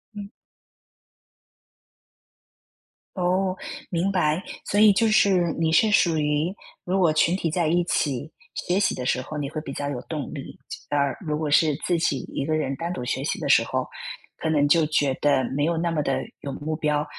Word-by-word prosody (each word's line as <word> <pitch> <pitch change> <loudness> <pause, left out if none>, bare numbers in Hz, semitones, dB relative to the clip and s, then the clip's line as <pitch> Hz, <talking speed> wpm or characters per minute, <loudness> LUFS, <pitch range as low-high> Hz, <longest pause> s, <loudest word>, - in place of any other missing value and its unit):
嗯。 200 -1 -7 2.9
哦， 185 0 +1 0.3
明 180 +3 0
白。 165 -2 +1 0.2
所 205 - 0
以 215 -1 +8
就 225 +3 +2
是 190 -5 +3
你 160 -1 +1
是 215 +6 +4
属 170 -5 +3
于 150 +4 0 0.3
如 190 +2 0
果 170 -4 +4
群 165 +3 +3
体 170 -4 -1
在 170 -1 +1
一 175 +2 +2
起 150 -3 -1 0.2
学 180 +3 0
习 - - +2
的 125 - -5
时 130 - +1
候， 150 +4 -7
你 140 -2 -3
会 155 - -4
比 140 - -7
较 145 0 -3
有 125 -4 -4
动 150 -4 -5
力， - - -8 0.3
啊， 145 - 0 0.3
如 150 -1 -1
果 155 -2 -2
是 150 0 +4
自 175 - +2
己 140 -5 +1
一 135 - -2
个 155 +1 0
人 135 -3 -1
单 170 +4 -4
独 125 - -5
学 - - -2
习 - - -2
的 - - -3
时 - - +6
候， - - -2 0.5
可 160 - -2
能 145 -2 +3
就 160 +2 +4
觉 145 -3 +1
得 140 -3 +3
没 145 - +1
有 170 +1 0
那 170 +1 0
么 155 -2 0
地 135 - 0 0.3
有 140 - -5
目 155 +2 -3
标， 150 -1 0
160 Hz, 210 characters per minute, -24 LUFS, 145-175 Hz, 2.9 s, 以